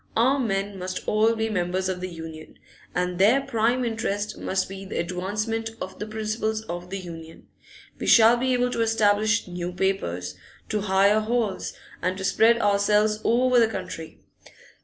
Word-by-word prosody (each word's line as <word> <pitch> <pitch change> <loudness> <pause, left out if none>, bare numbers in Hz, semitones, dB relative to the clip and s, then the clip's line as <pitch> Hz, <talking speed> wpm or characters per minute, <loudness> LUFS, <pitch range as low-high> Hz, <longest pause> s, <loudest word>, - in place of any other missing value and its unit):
Our 260 +5 +3
men 200 -4 -2
must 185 0 -5
all 220 +2 +3
be 220 0 -1
members 185 -2 -1
of 185 -1 -3
the 185 - -4
Union, 160 -2 -9 0.4
and 180 0 -1
their 220 +8 +5
prime 245 -1 0
interest 215 -2 -2
must 190 0 -1
be 195 0 -8
the 195 - -6
advancement 210 +6 -2
of 185 0 -7
the 210 - -4
principles 220 0 -2
of 175 -3 -6
the 195 - -4
Union. 165 -3 -10 0.5
We - - -4
shall 230 0 +7
be 260 +2 0
able 245 0 +1
to 230 - -1
establish 215 -2 +2
new 175 0 -4
papers, 175 - -2 0.4
to 210 -1 -1
hire 200 +1 +3
halls, 215 -3 -1 0.3
and 185 +1 -1
to 190 - -5
spread 225 +4 +4
ourselves 210 +1 +2
over 250 +2 +3
the 230 - +5
country. 185 -6 -7
205 Hz, 165 wpm, -25 LUFS, 185-225 Hz, 0.5 s, shall